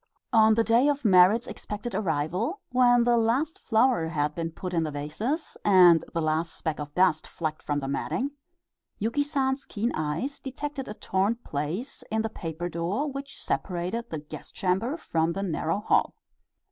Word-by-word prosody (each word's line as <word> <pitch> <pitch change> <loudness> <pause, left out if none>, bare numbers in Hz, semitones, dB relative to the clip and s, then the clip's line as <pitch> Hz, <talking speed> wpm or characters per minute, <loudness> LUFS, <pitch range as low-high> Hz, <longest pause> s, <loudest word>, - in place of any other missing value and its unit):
On 220 -1 +6
the 230 - +3
day 235 +5 +4
of 285 -3 0
Merrit's 195 +3 +6
expected 210 +3 -6
arrival, 180 - -1
when 245 -1 +5
the 240 0 +3
last 245 +8 +1
flower 225 -6 +2
had 150 -2 -1
been 165 +1 -3
put 180 +2 -6
in 165 - +2
the 160 - -1
vases, 155 - -3
and 180 -4 +7
the 165 - -1
last 155 +2 0
speck 160 -2 -3
of 145 0 -5
dust 180 -4 +3
flecked 155 -2 -4
from 145 -1 -1
the 135 - -4
matting, 250 - -2 0.7
Yuki 230 +7 0
San's 275 -2 0
keen 230 +1 -2
eyes 155 - -2
detected 275 +1 -5
a 210 - -6
torn 195 +4 0
place 175 - -4
in 220 0 0
the 225 - -2
paper 170 -4 -5
door 180 - -2
which 275 0 -7
separated 185 +6 -3
the 160 - -3
guest 150 0 -10
chamber 195 - 0
from 165 - 0
the 195 - -3
narrow 175 +1 -1
hall. - - +2
200 Hz, 170 wpm, -27 LUFS, 165-245 Hz, 0.7 s, and